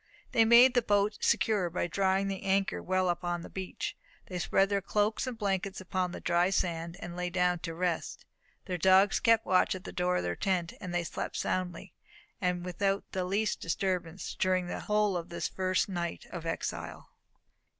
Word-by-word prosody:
They 225 - +5
made 240 +3 +8
the 245 - +4
boat 205 -1 +1
secure 205 -6 +2
by 170 - -1
drawing 190 +2 +1
the 195 -1 -3
anchor 195 0 0
well 185 0 +1
upon 175 0 -1
the - - -10
beach. 190 -1 -5 0.3
They 180 -1 -5
spread 195 +3 +2
their 200 -1 +1
cloaks 210 +5 0
and 250 -2 -4
blankets 195 -2 -1
upon 185 -1 -2
the - - -6
dry 175 +1 +2
sand, 170 -2 -1
and 175 0 -6
lay 180 0 -2
down 180 0 +1
to 165 -1 -5
rest. 175 -1 -2 0.4
Their 180 -2 -3
dogs 190 +2 +5
kept 230 -1 +4
watch 185 +1 +3
at 185 - -8
the - - -7
door 180 0 0
of - - -1
their 85 0 -2
tent; 180 - -1
and 180 - -5
they 175 0 0
slept 165 - -4
soundly, 180 -1 -3 0.5
and 180 -1 0
without 195 +2 -1
the 185 -1 -2
least 200 +3 0
disturbance, 180 0 -2
during 185 -1 +2
the 175 - -4
whole 210 -2 +1
of 175 0 -4
this 170 - -3
their - - -26
first 185 0 +1
night 175 -3 -4
of 170 -2 -6
exile. 165 - -4
185 Hz, 190 wpm, -30 LUFS, 175-195 Hz, 0.5 s, made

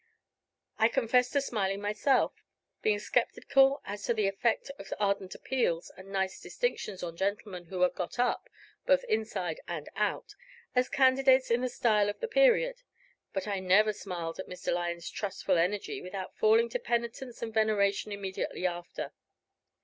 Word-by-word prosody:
I 220 - +6
confess 250 0 +2
to 280 - +1
smiling 200 -7 -1
myself, 210 +6 +1 0.4
being 210 -1 +2
sceptical 270 +5 +2
as 205 0 -5
to 235 - +1
the 210 -2 +2
effect 220 +7 0
of 195 - -10
ardent 200 -2 0
appeals 205 -11 -1
and 190 +1 -12
nice 190 -1 -1
distinctions 210 - -3
on 170 -1 -5
gentlemen 195 -1 -3
who 180 +1 -1
are 180 - +6
got 180 +5 -5
up, 245 0 0 0.4
both - - +4
inside 220 - -2
and 160 -4 -5
out, 420 - -1 0.4
as 250 0 +3
candidates 260 -1 +4
in 235 +1 +3
the 255 - 0
style 210 -4 +2
of 205 - -5
the 470 - -2
period; - - +3 0.5
but 190 +1 -3
I 200 -2 -1
never 200 +4 +4
smiled 175 -5 -5
at 190 - -5
Mr. 180 - -3
Lyon's 170 -1 -2
trustful 195 -3 -1
energy 195 +4 -1
without 185 +1 -6
falling 225 +2 +4
to - - -2
penitence 235 +1 -3
and 225 -1 -4
veneration 210 -2 +2
immediately 195 -2 -4
after. 175 -1 -4
210 Hz, 155 wpm, -30 LUFS, 190-245 Hz, 0.5 s, I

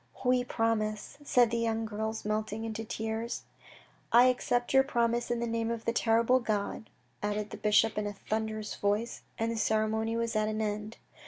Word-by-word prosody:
" - - -13
We 250 0 +4
promise," 225 -1 -1
said 245 -5 +4
the 235 - 0
young 225 -1 0
girls 220 0 -3
melting 215 +1 -2
into 225 0 -4
tears. 225 +1 -3 0.3
" - - -22 0.3
I 240 +2 +8
accept 245 0 0
your 265 - +8
promise 240 -3 0
in 240 -1 0
the - - 0
name 230 0 -1
of 230 -1 -4
the 230 - +1
terrible 235 +2 +3
God," 215 -1 -2 0.3
added 210 0 -2
the - - -6
bishop 210 +1 +3
in 210 - -2
a 205 - -4
thunderous 215 +1 -3
voice, 205 +4 -1 0.2
and 225 +1 0
the 230 - -3
ceremony 220 +1 +1
was 230 -1 -1
at 215 0 +2
an 215 0 -2
end. 210 0 -3
225 Hz, 190 wpm, -30 LUFS, 215-235 Hz, 0.3 s, I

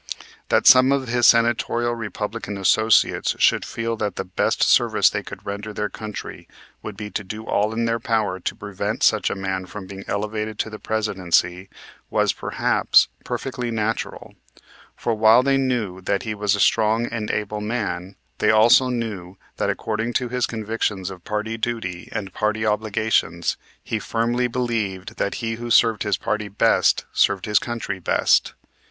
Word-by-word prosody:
That - - +3
some 130 +1 +8
of 135 -3 0
his 120 0 +4
senatorial 120 0 +2
Republican 110 -2 -5
associates 110 +3 +3
should - - +3
feel 115 0 -3
that 105 -4 -2
the - - -3
best 90 0 0
service - - +4
they - - -2
could - - -11
render 105 +2 -5
their 105 0 -2
country 105 +1 -8 0.3
would 105 -2 -8
be 105 0 -6
to 105 - -3
do 110 +3 -7
all 105 +1 +1
in 115 +1 -1
their 115 0 0
power 110 -5 -1
to - - -3
prevent 100 -2 -4
such - - +3
a - - -3
man 95 -1 -3
from 105 0 -8
being 95 +1 -9
elevated 105 +1 -3
to 110 - -3
the 110 - -8
Presidency 95 -4 0 0.4
was, - - +1
perhaps, - - +2
perfectly 125 -2 -4
natural: 110 -1 -3 0.6
for 115 - -1
while 110 +3 +5
they 135 0 +2
knew 120 -9 -1
that 100 +2 -1
he 110 - -3
was 105 -1 0
a - - -4
strong 110 +1 +3
and 115 -2 -4
able 105 0 -2
man, 105 -4 -3 0.2
they 105 - +2
also 115 +4 +6
knew 105 -7 -4 0.2
that, - - 0
according 110 +2 -2
to 125 -1 -1
his 125 0 0
convictions 105 -4 -3
of 90 -2 -11
party 110 +1 -3
duty 100 -7 -4
and 100 -4 -5
party 110 +1 -1
obligations, 105 -5 0 0.3
he 110 - -2
firmly 120 +3 0
believed 115 -4 -3
that 100 - -1
he 115 0 -2
who 120 - -5
served 115 -3 +4
his 105 -2 0
party 105 0 -2
best 100 +1 +2
served 100 -2 +2
his 105 -1 +3
country 115 -5 -4
best. 85 - +2
110 Hz, 170 wpm, -22 LUFS, 100-115 Hz, 0.6 s, some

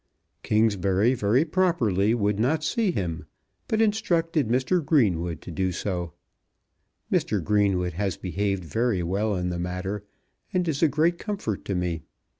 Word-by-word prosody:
Kingsbury 105 0 +2
very 120 +5 +2
properly 120 - +2
would 105 -2 0
not 150 +7 +1
see 210 +7 +1
him, 85 - -3 0.4
but 220 0 +2
instructed 170 - +1
Mr. 130 +9 +1
Greenwood 90 - +1
to - - -8
do 95 +3 -1
so. 90 -2 -3 1.0
Mr. - - +1
Greenwood 100 -4 +1
has 95 +1 -2
behaved 100 0 -2
very 110 0 0
well 100 +4 0
in 90 -1 -1
the 85 -1 -3
matter, 90 +3 -3 0.5
and 180 -1 0
is 150 -3 -1
a 165 - +6
great 160 +4 +1
comfort 195 - -3
to 100 - -2
me. 90 -2 -1
105 Hz, 145 wpm, -26 LUFS, 90-155 Hz, 1.0 s, a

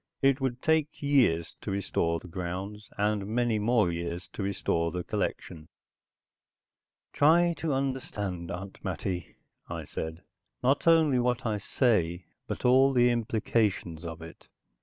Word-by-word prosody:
It 135 0 +4
would 125 -2 -2
take 160 -2 +1
years 120 - +3
to - - -5
restore 85 -4 0
the 90 - -12
grounds, 95 +4 -5
and 105 -1 0
many 115 0 +1
more 105 -4 +3
years 85 +1 -4
to - - -5
restore 90 -4 0
the 90 +1 -4
collection. 80 -2 -3 1.5
"Try 170 +4 +5
to 160 - -1
understand, 105 -10 -3
Aunt 95 +1 -7
Mattie," 90 0 -4 0.3
I - - -5
said. 80 +2 -6 0.4
"Not 135 +6 +2
only 160 -6 +5
what 125 +1 0
I 105 -2 0
say, 95 -7 +1 0.2
but - - -5
all 135 +2 +5
the 120 -1 +5
implications 110 -7 0
of 80 -1 -7
it. 80 - -12
105 Hz, 140 wpm, -29 LUFS, 90-130 Hz, 1.5 s, Try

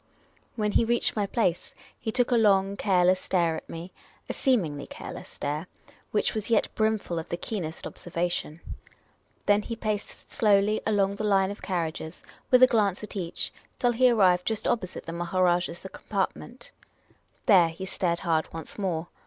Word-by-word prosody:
When 210 -2 0
he 230 - +4
reached 235 +1 +1
my 205 -2 0
place, 180 -6 -1 0.2
he 220 - -3
took 245 +1 +1
a - - +5
long, 200 -3 +4
careless 185 -2 +3
stare 170 -4 +1
at - - -8
me 170 +3 -7 0.2
— - - -31
a - - -1
seemingly 170 - 0
careless - - -8
stare, 150 +4 -4 0.4
which 210 - +1
was 215 0 -3
yet 225 -2 +2
brimful 215 -6 0
of 160 - -8
the 170 - -2
keenest 175 -6 -5
observa 175 0 -3
tion. 160 -1 -4 0.8
Then 205 0 +4
he 230 +2 -5
paced 215 -2 -4
slowly 210 0 +3
along 200 -2 +2
the 215 - -3
line 195 -2 +3
of 205 - -9
carriages, 165 -2 -3 0.3
with 255 0 +6
a - - +10
glance 210 -5 +1
at 210 - -7
each, 175 -4 -3 0.2
till 245 - +2
he 250 +2 +4
arrived 185 -6 +4
just 220 0 0
opposite 205 -7 -1
the 165 - -6
Maharajah's 175 0 0
compartment. 235 - -4 0.7
There 185 -8 +6
he 165 +4 -7
stared 175 -2 -1
hard 165 -3 0
once 165 +4 -8
more. 175 -4 -1
195 Hz, 170 wpm, -27 LUFS, 175-215 Hz, 0.8 s, a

